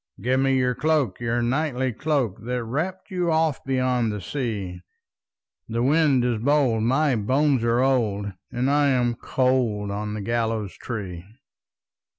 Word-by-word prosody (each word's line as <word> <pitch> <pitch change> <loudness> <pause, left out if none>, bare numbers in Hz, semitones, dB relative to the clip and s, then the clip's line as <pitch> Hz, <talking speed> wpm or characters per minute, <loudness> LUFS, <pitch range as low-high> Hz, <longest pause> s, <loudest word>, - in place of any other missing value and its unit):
"Give 130 +2 +1
me 135 0 +2
your 125 -1 +2
cloak, 150 -8 0
your 120 0 0
knightly 130 0 0
cloak, 130 -6 -1
That 125 +1 -2
wrapped 170 - -4
you 180 -2 0
oft 160 -4 0
beyond 130 -3 +1
the 105 - -4
sea; 100 - -4 0.9
The 115 +1 -1
wind 140 -2 +3
is 120 -3 0
bold, 130 -3 +2
my 135 +4 +2
bones 130 +4 +1
are 115 +1 +2
old, 105 -7 0 0.2
And 125 +2 -1
I 145 0 +3
am 125 -3 +2
cold 120 -5 0
on 105 +1 -3
the 105 - -4
gallows 115 -2 -1
tree." 95 -8 -6
125 Hz, 150 wpm, -24 LUFS, 110-135 Hz, 0.9 s, wind